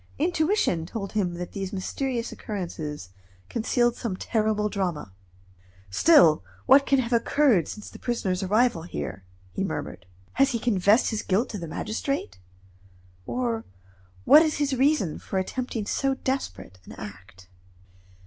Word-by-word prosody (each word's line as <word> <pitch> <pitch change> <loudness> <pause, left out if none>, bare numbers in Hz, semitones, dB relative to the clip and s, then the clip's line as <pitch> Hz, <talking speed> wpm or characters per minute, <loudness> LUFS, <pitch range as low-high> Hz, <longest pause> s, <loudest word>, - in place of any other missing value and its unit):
Intuition 315 - +1
told 200 +1 -5
him 185 -5 -1
that 175 0 -6
these 195 -1 -4
mysterious 235 +5 -3
occurrences 160 - -5 0.4
concealed 240 +1 +1
some 210 -7 -4
terrible 215 -1 0
drama. 180 - -3 0.8
"Still, 165 - +6 0.2
what 275 +1 +6
can 275 - +4
have 250 -2 -1
occurred 235 - +3
since 210 - -8
the - - -11
prisoner's 200 -6 -1
arrival 210 -1 +2
here?" 105 - -6 0.3
he - - -2
murmured. 90 - -5 0.3
"Has 275 +1 +3
he - - +1
confessed 215 0 +3
his 220 - -2
guilt 200 +6 0
to 210 - -5
the 170 - -6
magistrate, 215 - -3 0.9
or 235 -3 -1 0.6
what 305 - +9
is 315 -2 +1
his 285 -2 0
reason 265 - +1
for 190 - -4
attempting 225 +3 -3
so 270 +5 0
desperate 95 - -4
an - - -10
act?" 95 -1 -11
215 Hz, 140 wpm, -26 LUFS, 180-255 Hz, 0.9 s, what